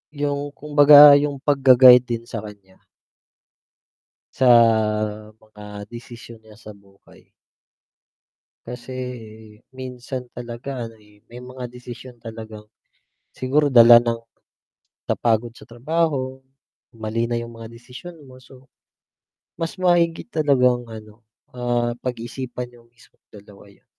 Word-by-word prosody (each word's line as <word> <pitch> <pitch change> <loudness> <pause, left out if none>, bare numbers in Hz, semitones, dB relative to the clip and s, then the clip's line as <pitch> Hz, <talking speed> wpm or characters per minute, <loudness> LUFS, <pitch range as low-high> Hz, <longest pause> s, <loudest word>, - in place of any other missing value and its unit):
Yung 145 0 -4
kumbaga 145 -1 +7
yung 145 0 -2
pag-ga-guide 130 -3 +6
din 115 - -9
sa 115 -1 -7
kanya. 100 -3 -14 1.6
Sa 130 - +1 0.9
mga 105 -1 -12
desisyon 115 -1 -12
niya 110 0 -18
sa 110 -3 -12
buhay. 100 -1 -23 1.4
Kasi 125 +1 -9 0.8
minsan 130 0 -8
talaga 120 +3 -7
ano, 115 -1 -11
eh, 105 -1 -24
may 120 - -10
mga 125 -1 -9
desisyon 125 0 -12
talagang 110 -2 -11 0.7
siguro 140 +4 0
dala 120 -1 +9
ng 115 -1 -1 0.8
napagod 115 0 -1
sa - - -18
trabaho, 130 0 -2 0.6
mali 115 +1 -3
na 120 - -1
yung 115 0 -7
mga 115 -1 -11
desisyon 125 +9 -13
mo 130 -1 -16
so, 130 +1 -18 0.9
mas 165 -1 -4
mahigit 175 +1 +1
talagang 125 - +1
ano, 110 0 -13 0.3
ah, 120 -1 -2
pag-isipan 125 0 -6
niyo 120 -1 -21
mismong 115 -1 -26
dalawa 100 -1 -16
'yun. 100 -1 -23
120 Hz, 115 wpm, -21 LUFS, 115-130 Hz, 1.6 s, dala